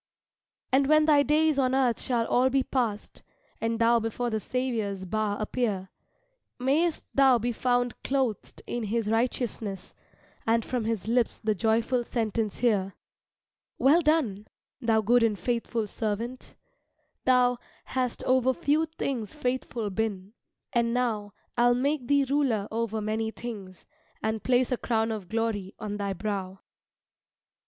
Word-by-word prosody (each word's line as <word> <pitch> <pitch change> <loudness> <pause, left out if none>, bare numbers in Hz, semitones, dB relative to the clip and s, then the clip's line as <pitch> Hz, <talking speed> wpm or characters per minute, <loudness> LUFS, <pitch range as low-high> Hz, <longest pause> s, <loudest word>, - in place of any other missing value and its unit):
And 270 +1 +4
when 310 +1 +5
thy 295 -2 +5
days 305 0 +3
on 260 -1 +2
earth 255 -3 +2
shall 235 -3 0
all 255 +3 +3
be 270 0 +2
past, 230 -7 -2 0.4
And 230 0 0
thou 230 +1 +4
before 230 +2 -2
the 220 - 0
Saviour's 220 -6 -2
bar 210 +1 -1
appear, 210 -4 -2 0.7
Mayst 300 +6 +1
thou 270 -2 +5
be 240 +1 -1
found 245 0 0
clothed 260 -6 -2
in 240 -2 -3
his 220 +1 -1
righteousness 225 -4 -2 0.5
And 230 0 +2
from 245 -3 -2
his 225 -3 -2
lips 235 0 +1
the 220 -1 0
joyful 230 +4 +1
sentence 225 -3 -2
hear 200 -6 +1 0.8
"Well 295 +6 +5
done, 280 - +1 0.3
thou 225 -2 +3
good 240 +3 +4
and 220 -3 +2
faithful 235 -1 -1
servant; 225 +4 -4 0.7
thou 250 -1 +4 0.3
Hast 255 -2 -2
over 260 0 +3
few 315 +1 +1
things 265 -8 -4
faithful 250 -6 -2
been, 205 -1 -3 0.4
and 235 0 +1
now 215 -5 -1 0.2
I'll 245 0 +5
make 270 0 0
thee 285 -1 +3
ruler 260 -7 +1
over 220 -1 -2
many 220 +1 -1
things, 205 -6 -8 0.4
And 220 0 -1
place 255 0 +2
a 250 - +1
crown 225 -1 0
of 205 -5 -5
glory 220 -4 -2
on 205 -1 -4
thy 200 -1 -2
brow." 195 -1 -4
230 Hz, 140 wpm, -27 LUFS, 215-255 Hz, 0.8 s, when